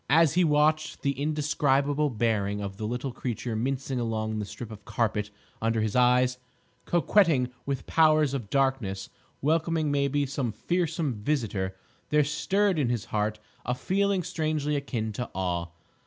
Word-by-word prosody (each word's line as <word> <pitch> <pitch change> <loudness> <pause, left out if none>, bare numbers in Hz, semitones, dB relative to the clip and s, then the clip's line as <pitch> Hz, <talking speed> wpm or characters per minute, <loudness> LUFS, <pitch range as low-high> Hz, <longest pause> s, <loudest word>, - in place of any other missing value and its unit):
As 160 +1 +5
he 180 +2 +4
watched 155 0 +2
the 140 - +2
indescribable 145 0 +1
bearing 105 -4 0
of 100 -1 -5
the 105 0 -3
little 125 +3 -3
creature 120 -1 -4
mincing 130 +2 -1
along 110 -2 -2
the 105 - -2
strip 115 +2 -8
of 105 -1 -10
carpet 105 -2 -1 0.3
under 115 0 +1
his 110 -1 -1
eyes, 125 0 +4 0.5
coquetting 165 -7 +3 0.2
with 140 -1 0
the - - -16
powers 155 -3 +4
of 120 -7 -4
darkness, 130 -9 0 0.3
welcoming, 160 0 +1
maybe, 140 0 +1
some 130 -5 -2
fearsome 165 -4 -1
visitor, 105 -5 -2 0.3
there 150 0 +4
stirred 190 +5 +1
in 130 -5 +1
his 120 -3 -1
heart 105 0 0 0.3
a 125 - -1
feeling 195 +5 +1
strangely 155 -2 -1
akin 120 -6 -2
to 120 +3 -4
awe. 90 -2 -1
135 Hz, 155 wpm, -27 LUFS, 110-150 Hz, 0.5 s, As